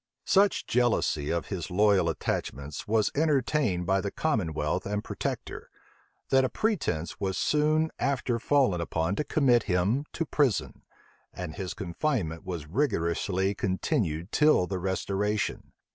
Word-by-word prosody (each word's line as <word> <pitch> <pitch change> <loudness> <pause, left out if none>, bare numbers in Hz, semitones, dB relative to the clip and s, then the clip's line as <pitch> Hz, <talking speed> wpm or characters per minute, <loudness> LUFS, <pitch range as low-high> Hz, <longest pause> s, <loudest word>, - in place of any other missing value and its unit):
Such 200 0 +3
jealousy 115 -11 +1
of 85 -1 -2
his 90 -5 -4
loyal 95 -2 +3
attachments 70 -2 -4
was 110 0 +2
entertained 140 - +1
by 95 +2 +2
the 100 - -2
commonwealth 90 - -1
and 105 +1 -2
protector, - - -5 0.6
that 135 0 +4
a 130 - +1
pretence 155 - -1
was 95 -2 -2
soon 155 +1 +2
after 125 -3 0
fallen 125 -10 +2
upon 85 +3 -1
to - - +1
commit 135 -5 +3
him 100 +10 +1
to 165 - -2
prison; 140 -8 0 0.5
and 90 -4 -6
his 90 +2 -5
confinement 95 - -2
was 85 -5 -5
rigorously 95 - 0
continued 95 - -1
till 150 -11 +4
the 95 0 -3
restoration. 100 +3 -2
100 Hz, 130 wpm, -28 LUFS, 90-135 Hz, 0.6 s, that